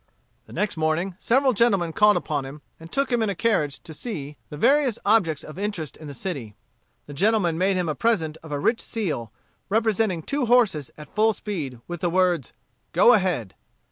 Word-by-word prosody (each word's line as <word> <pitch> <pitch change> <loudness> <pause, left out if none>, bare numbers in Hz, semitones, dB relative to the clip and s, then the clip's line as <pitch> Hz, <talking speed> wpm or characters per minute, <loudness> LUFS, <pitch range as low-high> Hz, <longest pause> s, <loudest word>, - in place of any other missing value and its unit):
The - - -13
next 210 -5 -1
morning, 160 +4 0
several 260 +2 +3
gentlemen 195 -7 +2
called 210 +2 +5
upon 145 -3 -2
him, 140 +2 -10 0.2
and 165 +1 -12
took 275 -1 0
him 240 -1 +2
in 220 - +1
a 200 - -2
carriage 170 -11 0
to 160 - -9
see 150 - -5
the 150 - -7
various 275 - +3
objects 190 -9 +2
of 155 +4 -9
interest 200 -7 -3
in 155 - -11
the 140 - -8
city. 125 - -5 0.5
The 145 - -9
gentlemen 195 +1 +2
made 185 +3 +1
him 180 -2 -1
a 155 - 0
present 160 - 0
of 160 - -11
a 145 - -1
rich 225 - +1
seal, 150 - -3 0.4
representing 215 -5 +1
two 280 - -1
horses 220 - +3
at 150 0 -12
full 220 +2 +3
speed, 155 - -5
with 175 -1 -6
the 175 - +1
words, 180 -1 +1 0.4
"Go 245 - +6
Ahead." 180 - 0
180 Hz, 195 wpm, -24 LUFS, 155-220 Hz, 0.5 s, Go